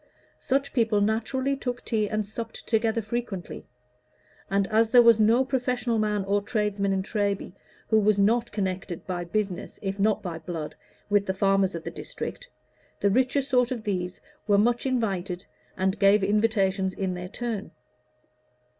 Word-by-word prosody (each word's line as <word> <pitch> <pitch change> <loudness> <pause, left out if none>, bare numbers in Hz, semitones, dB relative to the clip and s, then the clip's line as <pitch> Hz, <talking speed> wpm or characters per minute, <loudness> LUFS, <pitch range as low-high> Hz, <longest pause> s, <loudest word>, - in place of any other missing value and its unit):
Such 275 +1 0
people 225 -4 +2
naturally 230 +6 0
took 245 -2 -4
tea 215 -3 0
and 215 -1 -1
supped 225 +2 -7
together 225 0 +1
frequently; 215 -4 -5 0.8
and 195 0 +2
as 220 +1 +3
there 240 0 +7
was 230 -1 +6
no 230 +5 +4
professional 250 -3 0
man 210 -2 0
or 200 +1 +1
tradesman 205 -2 -1
in 190 -1 0
Treby 200 -3 -2 0.4
who 220 - +5
was 210 -1 +3
not 230 +4 +2
connected 190 -3 -3
by 180 -2 -3
business, 195 0 -3
if 195 0 -3
not 210 +1 +2
by 170 -3 -4
blood, 160 -2 -5 0.4
with 205 -1 +3
the 190 - -1
farmers 195 -1 +2
of 165 - -5
the - - -5
district, - - -7 0.5
the 200 - +2
richer 260 +5 +2
sort 250 -3 +2
of 245 -4 -4
these 185 -4 -3 0.3
were 205 -1 +4
much 240 +5 +2
invited, 195 -7 -1 0.3
and 190 +2 0
gave 200 0 +5
invitations 195 -2 +1
in 190 -2 -2
their 180 0 -6
turn. 225 -2 -4
210 Hz, 160 wpm, -26 LUFS, 195-235 Hz, 0.8 s, there